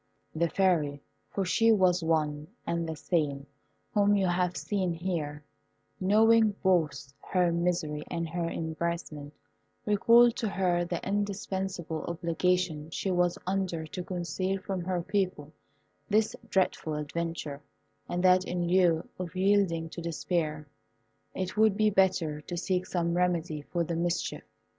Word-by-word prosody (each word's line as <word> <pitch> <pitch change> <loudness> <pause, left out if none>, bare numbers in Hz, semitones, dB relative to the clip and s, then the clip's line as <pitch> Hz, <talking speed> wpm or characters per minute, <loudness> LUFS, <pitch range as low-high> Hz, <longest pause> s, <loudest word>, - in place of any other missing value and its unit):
The 165 +1 +1
Fairy 160 -7 +1 0.3
(for 195 - -2
she 225 +5 +4
was 185 -5 +3
one, 150 -2 0 0.2
and 170 -1 -1
the 160 - -3
same 145 -4 -1 0.5
whom 205 -1 +4
you 195 -1 +2
have 180 0 0
seen 190 -4 -1
here), 160 -4 -3 0.6
knowing 220 +2 +4
both 150 -7 +1
her 180 -2 +1
misery 170 -3 -1
and 170 -1 -2
her 170 +1 -2
embarrassment, 160 -3 -4 0.5
recalled 230 +3 +5
to 225 -4 -1
her 180 -3 +1
the - - -4
indispensable 190 -4 -2
obligation 170 -1 0
she 190 +3 -2
was 175 0 +2
under 185 -4 -1
to 180 +3 -6
conceal 185 +2 -2
from 190 -1 -4
her 180 -2 -1
people 185 -6 -2 0.6
this 215 +1 +2
dreadful 180 -4 0
adventure, 150 -1 -4 0.5
and 175 +1 -1
that 185 0 +5
in 175 -1 -2
lieu 175 -2 +3
of 180 -1 -5
yielding 185 -4 +2
to 170 - -7
despair, 155 -2 -2 0.7
it 185 +1 -3
would 215 -2 +4
be 215 -1 +3
better 185 -6 +2
to 175 +3 -6
seek 185 +1 -1
some 170 -1 0
remedy 175 -4 0
for 170 +4 -2
the 170 +1 -3
mischief. 170 +1 -1
175 Hz, 140 wpm, -29 LUFS, 160-190 Hz, 0.7 s, recalled